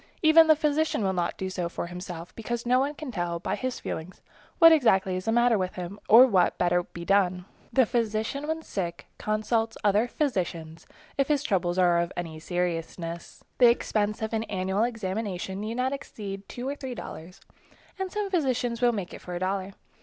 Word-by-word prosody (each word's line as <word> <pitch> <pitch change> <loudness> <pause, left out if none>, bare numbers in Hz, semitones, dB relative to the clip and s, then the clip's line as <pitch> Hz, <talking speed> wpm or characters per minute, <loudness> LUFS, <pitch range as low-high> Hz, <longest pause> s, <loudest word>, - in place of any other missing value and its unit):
Even 320 +1 +7
the 315 - +7
physician 300 -4 +1
will 190 -1 +1
not 175 -2 -1
do 190 - -3
so 180 -2 -3
for 170 - -4
himself, 175 -1 -8
because 235 +1 -4
no 250 +1 +4
one 285 +3 -1
can 290 -3 -6
tell 175 -4 -2
by 170 - -3
his 255 -1 -3
feelings 165 +4 -6 0.4
exactly 245 - +6
what - - -1
is 185 - -6
the 225 - +1
matter 240 -2 +4
with 185 0 -2
him 180 +3 -6
or 235 +4 +10
what 195 -8 +3
would - - -36
better 175 0 +2
be 170 0 -9
done. 185 -2 +2 0.3
The 260 -2 +4
physician 225 +5 -1
when 320 +1 -2
sick, 175 - -4
consults 220 +1 0
other 210 +3 +3
physicians, 170 - -3 0.3
if 275 - +3
his 290 -2 +1
trouble 185 -7 +1
is 175 - -2
of 170 -2 +3
any 165 -3 -5
seriousness. 170 0 -4 0.2
The 245 -2 +8
expense 215 -2 0
of 220 - -3
an 225 0 0
annual 190 +2 0
examination 195 -4 -3
need 220 +2 -4
not 255 +2 0
exceed 200 -7 -7
two 245 +1 -5
or 280 - -2
three 265 -3 -6
dollars, 175 -3 -9 0.6
and 380 -1 -3
some 415 -2 -3
physicians 255 -8 0
will 240 -1 +4
make 195 -5 -4
it - - -9
for 180 - -6
a - - -3
dollar. 190 +1 -2
205 Hz, 200 wpm, -27 LUFS, 180-245 Hz, 0.6 s, or